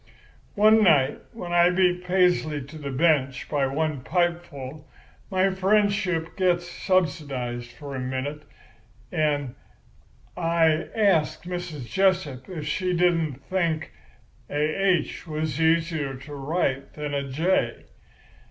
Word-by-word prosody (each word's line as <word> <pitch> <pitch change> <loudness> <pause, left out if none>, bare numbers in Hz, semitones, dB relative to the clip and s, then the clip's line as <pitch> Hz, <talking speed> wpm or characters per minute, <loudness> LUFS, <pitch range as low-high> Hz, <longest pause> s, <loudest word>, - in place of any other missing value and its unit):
"One 215 +1 +6
night 145 -7 +4
when 175 -6 -6
I 175 0 +6
beat 180 -1 +2
Paisley 180 -5 +2
to 150 +4 -11
the 140 -2 -5
bench 135 -2 +1
by 140 -3 +1
one 150 0 -1
pipeful, 160 -5 -2 0.4
my 190 0 +2
friendship 190 -3 +1
gets 175 -2 +1
subsidised 140 -11 -1
for 140 -2 -8
a - - -3
minute, 130 +4 -3 0.7
and 145 -6 0 0.8
I 165 -2 +2
asks 195 -8 +2
Mrs. 175 -6 -5
Jessup 185 -9 0
if 160 -5 -5
she 180 +4 -1
didn't 165 -6 +1
think 170 -4 -1 0.6
a - - -6 0.2
'H' 185 -3 0
was 155 -1 -2
easier 160 -4 +1
to 135 +3 -10
write 140 -1 -2
than 150 -1 -5
a 140 - 0
'J. 165 +8 0
160 Hz, 120 wpm, -25 LUFS, 145-180 Hz, 0.8 s, One